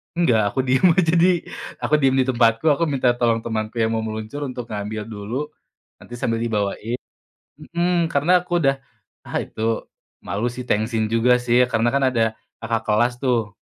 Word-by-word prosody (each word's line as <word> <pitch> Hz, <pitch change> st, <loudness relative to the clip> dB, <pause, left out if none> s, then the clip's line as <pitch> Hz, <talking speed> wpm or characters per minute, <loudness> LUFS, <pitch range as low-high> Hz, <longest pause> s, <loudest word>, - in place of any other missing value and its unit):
Enggak, 110 Hz, -12 st, +2 dB
aku -, -, -2 dB
diem 130 Hz, +7 st, +3 dB
aja 165 Hz, -2 st, +2 dB
di 175 Hz, +2 st, +5 dB, 0.5 s
aku -, -, -2 dB
diem 135 Hz, -2 st, +2 dB
di -, -, +1 dB
tempatku, 115 Hz, +2 st, +2 dB
aku 170 Hz, -, -1 dB
minta 135 Hz, -4 st, +1 dB
tolong 115 Hz, -2 st, +1 dB
temanku 110 Hz, 0 st, -4 dB
yang 110 Hz, -, +2 dB
mau 110 Hz, -, -2 dB
meluncur 110 Hz, +6 st, -5 dB
untuk 125 Hz, -3 st, -6 dB
ngambil 105 Hz, 0 st, -4 dB
dulu, 105 Hz, +3 st, -5 dB, 0.6 s
nanti 120 Hz, -, -14 dB
sambil 115 Hz, -1 st, 0 dB
dibawain. 115 Hz, +1 st, -2 dB, 0.6 s
Mhm, 170 Hz, +2 st, -1 dB
karena 145 Hz, +5 st, +1 dB
aku 180 Hz, -, -26 dB
udah, 135 Hz, -3 st, +2 dB, 0.5 s
ah -, -, -4 dB
itu 110 Hz, -, -10 dB, 0.6 s
malu 100 Hz, +6 st, -3 dB
sih, 125 Hz, 0 st, -8 dB
tengsin 110 Hz, +1 st, 0 dB
juga 115 Hz, +2 st, +3 dB
sih. 120 Hz, +1 st, +4 dB
Karena 115 Hz, +1 st, +1 dB
kan 140 Hz, -, +2 dB
ada 115 Hz, -2 st, +2 dB, 0.4 s
kakak 115 Hz, -1 st, -2 dB
kelas 115 Hz, +3 st, +2 dB
tuh. 115 Hz, -5 st, 0 dB
120 Hz, 170 wpm, -22 LUFS, 110-135 Hz, 0.6 s, di